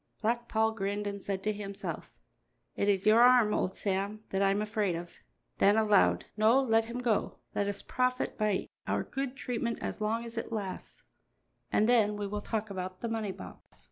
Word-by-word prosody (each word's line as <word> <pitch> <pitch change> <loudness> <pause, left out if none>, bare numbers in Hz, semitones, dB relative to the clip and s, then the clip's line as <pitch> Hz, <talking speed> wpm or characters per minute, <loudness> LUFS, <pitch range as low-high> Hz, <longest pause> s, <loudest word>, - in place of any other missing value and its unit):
Black 235 +2 0
Paul 220 -1 +2
grinned 205 -1 -3
and 200 -1 -4
said 195 -1 -3
to 215 - 0
himself: 200 -1 -6 0.6
"It 200 - +1
is 195 -1 +1
your 220 +2 +6
arm, 245 -4 +6
old 185 - -1
Sam, 200 +2 -2
that 195 - 0
I 195 - +4
am 200 +1 +1
afraid 210 -3 0
of." 170 +1 -7 0.5
Then 205 +2 +5
aloud: 210 -3 +4
"No, 220 +5 +5
let 225 -4 +3
him 235 +2 -6
go. 240 -4 0 0.2
Let 200 - 0
us 200 0 -2
profit 255 0 0
by 210 -3 0 0.2
our - - 0
good 270 -1 -4
treatment 240 -3 -2
as - - -5
long 225 +2 0
as 230 0 -8
it 230 - -7
lasts, 200 -4 -5 0.7
and 215 - +3
then 215 -4 +3
we 205 - -3
will 205 +1 -3
talk 215 -1 -3
about 185 -1 -5
the 235 - -2
money 220 -3 -2
box." 90 - -12
215 Hz, 195 wpm, -30 LUFS, 200-230 Hz, 0.7 s, your